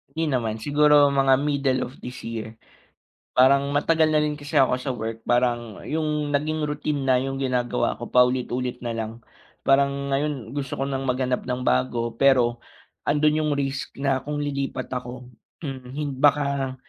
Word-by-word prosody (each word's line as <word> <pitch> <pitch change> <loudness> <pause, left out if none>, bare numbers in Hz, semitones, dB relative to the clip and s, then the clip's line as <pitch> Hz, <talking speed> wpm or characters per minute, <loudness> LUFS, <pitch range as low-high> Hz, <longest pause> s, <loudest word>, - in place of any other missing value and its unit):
Hindi 160 -2 0
naman 115 -4 0
siguro 145 0 +5
mga 135 -1 +4
middle 140 -2 0
of 125 - -9
this 125 0 -8
year. 110 -1 -6 0.8
Parang 140 +2 +5
matagal 160 +2 +2
na 155 0 +3
rin 150 0 0
kasi 145 +1 -6
ako 130 -1 +4
sa 135 - -3
work, 115 -2 -4
parang 120 -3 0
yung 150 -2 -1
naging 155 +1 0
routine 150 -1 -2
na 130 -1 +4
yung 135 0 -3
ginagawa 125 -2 0
ko, 120 - -5
paulit-ulit 125 0 +1
na 120 -2 -4
lang 110 0 -3 0.6
parang 140 0 +3
ngayon 135 -3 -2
gusto 135 -1 -4
ko 135 - -1
nang 135 -1 -3
maghanap 125 0 -1
ng 125 0 -3
bago. 115 - 0
Pero 125 -3 +4 0.5
andun 150 +1 +2
yung 150 - 0
risk 135 -1 -2
na 135 -1 0
kung 145 0 -3
lilipat 140 -1 -3
ako, 125 0 -6 0.3
mhm, 135 -5 -6
hin 145 +1 -3
baka 140 -1 +2
135 Hz, 165 wpm, -24 LUFS, 125-145 Hz, 0.8 s, siguro